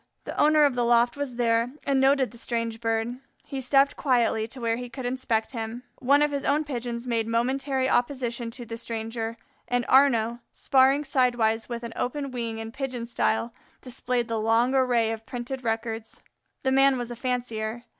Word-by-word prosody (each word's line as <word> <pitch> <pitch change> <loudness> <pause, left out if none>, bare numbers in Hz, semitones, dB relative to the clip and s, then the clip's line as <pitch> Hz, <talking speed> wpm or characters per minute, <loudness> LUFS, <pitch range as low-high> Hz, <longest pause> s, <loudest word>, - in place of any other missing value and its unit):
The - - -6
owner 305 0 +5
of 285 -2 +4
the 245 0 0
loft 235 0 +3
was 285 -4 -4
there 235 +1 +1
and 275 -1 +2
noted 270 -1 +3
the 235 - -13
strange 230 -1 -2
Bird. 225 +2 -1 0.3
He 275 -2 -5
stepped 275 +2 +3
quietly 235 -4 +1
to 255 +3 -10
where 230 -1 0
he 245 0 -6
could 260 +1 -7
inspect 245 -3 -1
him. 230 0 -5 0.2
One 280 +3 +4
of 295 - +1
his 280 -1 -2
own 295 +2 +2
Pigeons 240 -4 -4
made 230 -2 0
momentary 260 +3 0
opposition 245 -2 0
to 240 +1 -8
the 230 0 -6
stranger, 225 0 -4 0.3
and 245 -1 0
Arnaux, 240 -4 +4
sparring 270 +2 +3
sidewise 240 -5 +1
with 235 0 -5
an 235 - -6
open 275 +2 -3
wing 230 -3 -4
in 225 0 -6
Pigeon 255 -2 -4
style, 235 0 0 0.3
displayed 250 -1 -2
the 225 -1 -1
long 225 +4 +2
array 245 -4 +2
of 225 0 -6
printed 250 +1 -5
records. 225 -1 -3 0.4
The 265 - +1
man 270 0 +5
was 245 -1 -4
a - - -5
fancier. 235 -2 -3
240 Hz, 185 wpm, -26 LUFS, 230-265 Hz, 0.4 s, owner